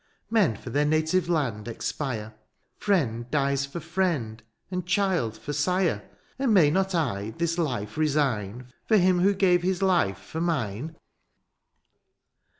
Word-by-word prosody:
" - - -47
Men 205 - +3
for 120 - -9
their 145 +4 +2
native 160 +4 +1
land 125 -10 -1
expire; 115 -2 -4 0.2
" - - -47
Friend 125 - +1
dies 140 -1 +1
for 155 +5 -6
friend, 160 -10 -1 0.3
and 180 -1 -2
child 180 - 0
for 145 - -6
sire; 180 - +1
'^ - - -29 0.2
And 265 -3 +2
may 155 -6 +6
not 190 +2 +1
I 110 -9 -1
this 170 0 -1
life 120 -9 -2
resign 125 -6 0
" - - -44
For 220 - +5
him 180 -1 +4
who 195 +3 +3
gave 180 -2 +3
his 185 +1 0
life 175 - +2
for 160 - -6
mine 150 - -2
155 Hz, 155 wpm, -26 LUFS, 120-180 Hz, 0.3 s, may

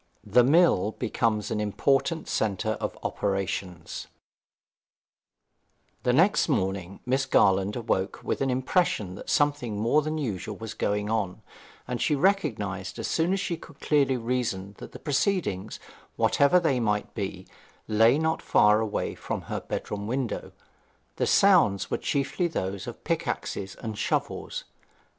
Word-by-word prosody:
THE 125 - +5
MILL 135 - +4
BECOMES 105 -3 -1
AN 105 - 0
IMPORTANT 135 - +1
CENTRE 110 +1 0
OF - - -3
OPERATIONS 95 -3 -3 1.9
The 125 - +2
next 170 +8 +4
morning 95 - -1
Miss 130 +2 +1
Garland 95 -4 +3
awoke 100 -4 -1
with - - -2
an 135 - +1
impression 130 - +1
that 95 - -9
something 145 -7 +1
more 115 +8 +3
than 155 +1 -3
usual 105 - -3
was 110 -1 -6
going 105 +1 -1
on, 100 -5 -2 0.4
and 125 -1 -3
she 150 - +2
recognized 110 - 0
as - - -3
soon 165 +2 +1
as 195 - +1
she 175 -3 -2
could 155 -3 -15
clearly 140 -3 +2
reason 115 -5 -2
that - - -9
the - - -9
proceedings, 135 - -1 0.4
whatever 145 +6 +4
they 145 -7 +1
might 105 -3 -1
be, 95 -3 -4 0.4
lay 115 +5 +5
not 160 +1 0
far 105 +1 +4
away 110 -2 -2
from - - -4
her - - -4
bedroom 105 0 -4
window. 125 -1 -3 0.7
The - - +1
sounds 175 - +4
were - - 0
chiefly 140 +4 0
those 95 - -4
of - - -8
pickaxes 95 0 -2
and 110 -2 -6
shovels. - - -2
115 Hz, 140 wpm, -27 LUFS, 100-145 Hz, 1.9 s, THE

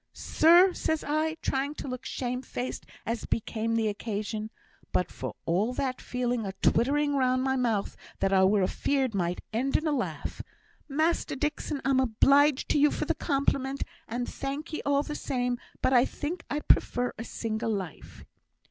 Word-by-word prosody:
'Sir,' 350 +4 +5
says 320 -2 -1
I, 310 +2 0
trying 275 +2 -1
to - - -6
look 255 -1 -5
shame 250 0 -3
faced 250 -1 -5 0.2
as 230 0 -2
became 225 0 -1
the 225 -1 +2
occasion, 215 0 -3 0.4
but 180 - 0
for - - -6
all 200 +9 +1
that, 260 -2 -2
feeling 245 -2 -1
a 195 -2 -4
twittering 285 +7 +2
round 255 -1 +2
my 265 0 +1
mouth 230 -6 0 0.2
that 195 - +1
I 190 -1 +5
were 200 0 +3
afeard 260 +6 0
might 180 -2 -1
end 260 +5 +2
in 310 - -4
a 310 - +2
laugh 280 -4 -3 0.5
'Master 315 +3 +1
Dixon, 295 0 -2
I'm 270 -1 +3
obleeged 275 +4 +4
to 295 - +3
you 295 +1 +6
for - - -2
the - - +1
compliment, 275 -2 0 0.2
and 240 +2 -3
thank 285 +4 -5
ye - - -2
all 285 0 +3
the 300 - -5
same, 245 -4 -1 0.2
but 260 - +3
I 245 -1 +7
think 325 +5 -5
I'd 295 +1 -3
prefer 245 0 +3
a - - -3
single 225 -1 -3
life.' 190 -7 -6
255 Hz, 175 wpm, -28 LUFS, 225-285 Hz, 0.5 s, I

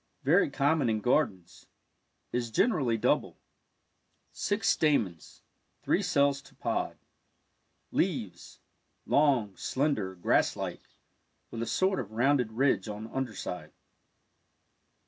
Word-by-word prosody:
Very 160 +7 +4
common 140 -1 +1
in 110 -1 +1
gardens 95 - -1 0.3
— - - -48
is 120 -1 -1
generally 125 - +2
double. 110 - 0 0.9
Six 205 - -1
stamens 105 - 0 0.2
— - - -44
three 195 - +2
cells 140 -7 +2
to - - -19
pod. - - -2 0.9
Leaves - - -2 0.2
— - - -46
long, 130 -9 +3
slender, 130 -10 -1
grass 90 - +2
like, - - -5 0.7
with 115 - -5
a 115 - -2
sort 190 0 +1
of 110 -3 -6
rounded 125 -1 +2
ridge 120 -5 +1
on 105 +2 -7
under 130 -5 -3
side. 90 -1 -6
125 Hz, 120 wpm, -29 LUFS, 105-145 Hz, 0.9 s, Very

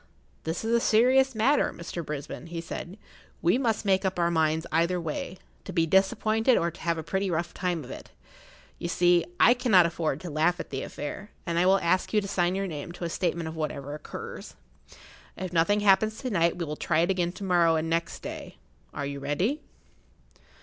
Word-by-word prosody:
"This 165 +6 -3
is 230 - 0
a 235 - +5
serious 255 +4 +4
matter, 260 +7 +3
Mr. 170 0 -6
Brisbane," 150 +2 -6
he 170 0 -5
said. 170 +3 -7 0.5
"We 175 +9 +3
must 225 -5 0
make 190 -1 +3
up 190 -1 -1
our 170 0 +2
minds 160 0 +1
either 170 +3 +2
way—to 170 +4 -7
be 165 -2 +2
disappointed 215 +7 +3
or 170 0 0
to - - -15
have 170 0 0
a 160 - -4
pretty 190 +4 -1
rough 170 0 -2
time 180 -4 -2
of 125 - -10
it. - - -9 0.7
You - - -3
see, 175 0 +3 0.2
I 245 - +7
cannot 235 -8 +4
afford 165 -4 -1
to 175 - -6
laugh 160 +4 +1
at - - -7
the 135 -1 -3
affair, 190 +8 -6 0.2
and 170 -1 0
I 180 - +3
will 195 +1 +6
ask 185 +5 +1
you 215 - +5
to 200 - -5
sign 180 -2 +1
your 195 0 -1
name 160 -2 -6
to 175 - -8
a 170 - -1
statement 170 -1 -1
of 160 - -6
whatever 145 -2 -4
occurs. 150 - -8 0.8
If 185 -1 -5
nothing 190 +5 +3
happens 210 +2 +4
to 255 -2 -4
night 170 -3 +2
we 170 - -2
will 150 0 -4
try 160 -1 +1
it 175 +3 +2
again 175 -2 0
to 185 - -8
morrow 175 -3 +3
and 160 0 -1
next 165 +1 -2
day. - - -7 0.4
Are 140 - -3
you 140 0 -5
ready?" 180 - -1
175 Hz, 205 wpm, -27 LUFS, 165-195 Hz, 0.8 s, I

